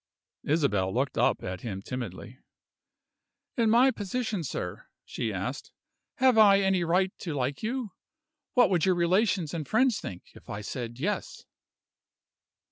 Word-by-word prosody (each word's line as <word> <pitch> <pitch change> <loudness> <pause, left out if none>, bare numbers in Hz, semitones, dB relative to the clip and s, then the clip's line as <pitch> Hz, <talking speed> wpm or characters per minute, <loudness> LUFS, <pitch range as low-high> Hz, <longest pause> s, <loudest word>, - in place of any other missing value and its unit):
Isabel 135 - +1
looked 130 +5 -1
up - - +2
at 95 -1 -5
him 100 -4 -5
timidly. 120 +1 -6 1.2
"In 230 -2 +2
my 245 +4 +5
position, 215 -3 -3
sir," 140 - -5 0.2
she - - -3
asked, - - -5 0.4
"have 255 -4 +4
I 200 -2 +7
any 190 -2 +2
right 185 +3 +1
to 165 -5 -4
like 135 +1 -2
you? 235 -1 -3 0.6
What 245 -5 +5
would 175 -4 +2
your 185 -1 +3
relations 180 -1 +1
and 160 -4 -4
friends 245 0 +2
think, 90 -2 -9
if - - -16
I 100 - -5
said 120 +2 -6
Yes?" 205 +8 -3
175 Hz, 140 wpm, -28 LUFS, -, 1.2 s, I